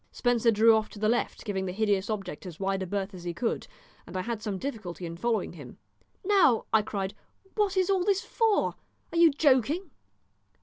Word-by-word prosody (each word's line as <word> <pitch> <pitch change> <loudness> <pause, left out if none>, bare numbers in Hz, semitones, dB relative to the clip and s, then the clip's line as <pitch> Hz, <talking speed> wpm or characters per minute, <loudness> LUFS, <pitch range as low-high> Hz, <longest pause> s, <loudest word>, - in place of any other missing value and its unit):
Spencer 245 -1 +2
drew 225 +1 +6
off 220 -1 0
to - - -12
the 215 +1 0
left, 240 +2 -1
giving 190 -3 -2
the - - -2
hideous 200 0 0
object 195 -5 -4
as 170 -3 -9
wide 195 0 -1
a 190 - -3
berth 200 +1 -3
as 180 -2 -9
he 175 -1 -4
could, 230 +6 -2 0.4
and - - -6
I - - 0
had 230 -1 -4
some 210 -3 -3
difficulty 185 -8 -5
in 165 0 -6
following 225 +5 -1
him. - - -11 0.5
"Now," 360 - +4
I 220 - +6
cried, 195 -2 -3 0.4
"what 405 -3 0
is 370 -1 +3
all 380 -2 +2
this 395 0 +2
for? 445 -3 +1 0.4
Are - - -1
you 335 -1 +8
joking?" 290 - +2
220 Hz, 205 wpm, -28 LUFS, 195-280 Hz, 0.5 s, you